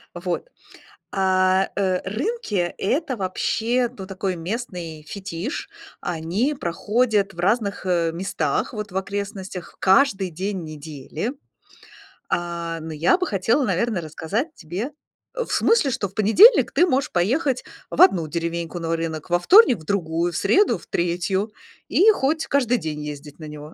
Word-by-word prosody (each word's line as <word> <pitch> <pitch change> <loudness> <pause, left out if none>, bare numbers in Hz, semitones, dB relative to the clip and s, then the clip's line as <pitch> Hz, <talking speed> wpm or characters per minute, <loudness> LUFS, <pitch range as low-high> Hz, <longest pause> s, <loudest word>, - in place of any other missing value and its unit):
Вот. 175 - -3 0.6
А, 185 0 +2
э, 185 -2 +1
рынки- 215 - -2
это 265 - 0
вообще, 230 +6 0
ну, 190 -2 -8
такой 190 -1 -3
местный 175 -4 -5
фетиш. 195 - -5 0.3
Они 180 - -1
проходят 210 +1 0
в 170 - -14
разных, 200 +1 0
э, 170 -2 +1
местах, 165 - -2
вот 210 -2 -5
в 185 - -3
окрестностях, 195 -2 -5
каждый 195 -2 +3
день 190 +2 -3
недели. 155 - -6 1.0
А, 170 -1 -2
ну, 160 0 -7
я 160 - +3
бы 365 -1 -2
хотела, 220 +8 +1
наверно, 235 -6 0
рассказать 195 - -3
тебе 185 - -5 0.4
в - - -3
смысле, 440 - +3
что 205 -4 -2
в 190 - -22
понедельник 225 - +6
ты 355 - +4
можешь 270 -4 +1
поехать 255 - +1 0.3
в - - -2
одну 175 - +5
деревеньку 170 +2 -3
на 165 -1 -1
рынок, 165 -2 -4
во 175 - +4
вторник- 360 - +7
в 155 - -13
другую, 170 -2 -1
в - - -4
среду- 410 - +3
в - - -17
третью 180 +4 -1 0.4
и 430 +4 +6
хоть 315 -3 0
каждый 250 -3 +2
день 150 -4 -4
ездить 150 0 -8
на 160 - -9
него. 150 +1 -9
190 Hz, 145 wpm, -23 LUFS, 170-235 Hz, 1.0 s, вторник